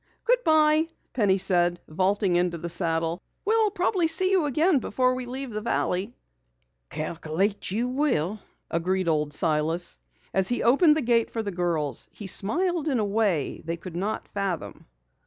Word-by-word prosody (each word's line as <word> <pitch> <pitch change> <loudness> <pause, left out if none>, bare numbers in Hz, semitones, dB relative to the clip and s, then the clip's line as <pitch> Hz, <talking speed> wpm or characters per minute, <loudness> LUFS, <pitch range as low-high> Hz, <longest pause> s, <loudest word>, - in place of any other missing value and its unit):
"Goodbye," 315 -10 +4 0.3
Penny 205 -6 +3
said, 175 -2 +3
vaulting 190 +3 +1
into 175 -1 +1
the 170 +1 -5
saddle. 165 0 -1 0.2
"We'll 440 0 +3
probably 370 -3 +1
see 370 +4 +2
you 370 -5 +3
again 305 +3 +3
before 255 +2 +1
we 255 -1 -5
leave 260 +1 -5
the 215 0 -4
valley." 205 -1 -1 0.7
"Calculate 165 +5 -2
you 225 +6 -1
will," 250 - 0 0.3
agreed 185 +2 0
Old 150 -2 +1
Silas. 160 - 0 0.3
As 190 -1 +2
he 245 - 0
opened 300 +7 +5
the 310 - 0
gate 235 -1 +2
for 225 - -3
the 200 - -3
girls 165 -7 -2
he 205 - -10
smiled 325 - 0
in 275 -4 +1
a 215 - +1
way 200 -8 0
they 165 +1 -3
could 175 0 -9
not 200 +5 -3
fathom. 195 -5 -4
205 Hz, 155 wpm, -26 LUFS, 175-275 Hz, 0.7 s, opened